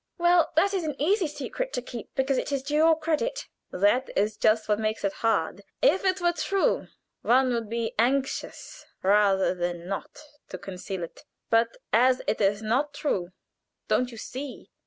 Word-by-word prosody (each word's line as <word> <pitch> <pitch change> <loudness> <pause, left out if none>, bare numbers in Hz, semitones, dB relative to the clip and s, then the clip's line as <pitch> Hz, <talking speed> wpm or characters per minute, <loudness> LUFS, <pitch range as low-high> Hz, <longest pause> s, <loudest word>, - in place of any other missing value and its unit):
Well, 345 -2 +4
that 395 +6 +3
is 380 -3 0
an 300 -3 -4
easy 365 +4 +2
secret - - -5
to - - -1
keep, 240 -3 -8
because 265 -1 +1
it - - -4
is 275 -2 -1
to 290 +2 -5
your 320 +1 +5
credit." 400 +11 -1 0.2
"That 205 +8 +2
is 210 +2 +1
just 215 0 +2
what 210 0 +1
makes 215 -1 -2
it 200 -1 0
hard. 200 -4 +1 0.2
If 445 -7 +3
it 375 0 +2
were 345 -1 +2
true, 390 +3 0 0.3
one 255 +1 +3
would 230 -3 -2
be 230 0 -2
anxious 265 +3 -1 0.2
rather 195 -1 +3
than 175 -1 -4
not 200 +11 -5 0.3
to - - -6
conceal 190 -1 -6
it; 165 - -9 0.3
but 230 0 +2 0.2
as 250 +3 +4
it 220 - -1
is 205 +2 +2
not 275 +7 0
true, 185 -13 -1 0.6
don't 250 - +2
you 230 - -10
see? 260 +4 -7
250 Hz, 180 wpm, -26 LUFS, 210-310 Hz, 0.6 s, your